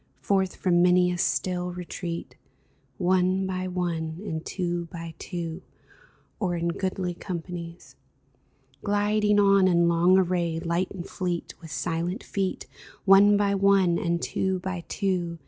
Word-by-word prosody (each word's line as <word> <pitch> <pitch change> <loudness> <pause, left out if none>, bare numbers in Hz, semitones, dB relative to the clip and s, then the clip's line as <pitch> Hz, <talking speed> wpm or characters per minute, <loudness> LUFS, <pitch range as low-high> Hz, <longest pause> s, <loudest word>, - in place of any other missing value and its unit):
Forth 190 -2 0
from 175 -2 +2
many 180 0 +4
a 175 - -2
still 180 -1 0
retreat, 175 -1 -6 0.6
One 185 +1 +2
by 185 -1 -3
one, 170 -3 -2
and 160 -4 -4
two 175 -2 -2
by 165 0 -8
two, 170 -1 -5 0.8
Or 180 -4 0
in 170 0 -1
goodly 185 0 -2
companies; 170 -1 -7 0.9
Gliding 210 0 +2
on 195 -1 +5
in 170 -2 +4
long 170 +2 +4
array, 175 -3 +1
Light 170 +2 -1
and 180 -2 -7
fleet, 180 -3 -3
with 165 - -10
silent 170 +6 -2
feet, 195 -2 -2 0.4
One 200 +1 +7
by 200 -1 +2
one, 195 -3 +3
and 170 0 0
two 190 +2 -1
by 180 -2 -4
two. 180 -4 -1
180 Hz, 135 wpm, -26 LUFS, 170-190 Hz, 0.9 s, One